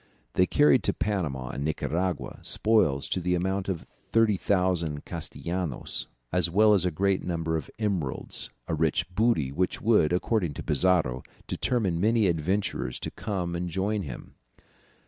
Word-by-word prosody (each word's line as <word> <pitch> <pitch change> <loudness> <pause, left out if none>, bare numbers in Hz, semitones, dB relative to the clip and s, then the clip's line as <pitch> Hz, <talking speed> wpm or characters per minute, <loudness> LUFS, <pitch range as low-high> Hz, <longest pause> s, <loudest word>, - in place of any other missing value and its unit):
They 90 - +3
carried 145 -4 +5
to - - +2
Panama 75 -12 -2
and 70 +3 -4
Nicaragua 85 +3 -2
spoils 90 -11 +2
to - - 0
the 90 0 +1
amount 95 +2 -1
of 90 -4 -3 0.3
30,000 90 -8 +2
castellanos, 85 -5 -4 0.2
as 90 -1 +1
well 105 +4 +5
as 95 -3 +3
a - - +3
great 95 +3 +1
number 80 -2 -1
of 80 - -3
emeralds, 95 - -2 0.2
a - - -2
rich 80 -1 +1
booty, 100 - +2
which 90 +6 -1
would, 105 -9 +3
according 90 -3 0
to - - -6
Pizarro, 75 -5 +2 0.2
determine 100 -10 0
many 110 +1 +3
adventurers 85 -6 -1
to - - -4
come 90 -5 -3
and 90 +1 -2
join 100 +4 -1
him. 65 -9 -8
90 Hz, 145 wpm, -27 LUFS, 80-100 Hz, 0.3 s, carried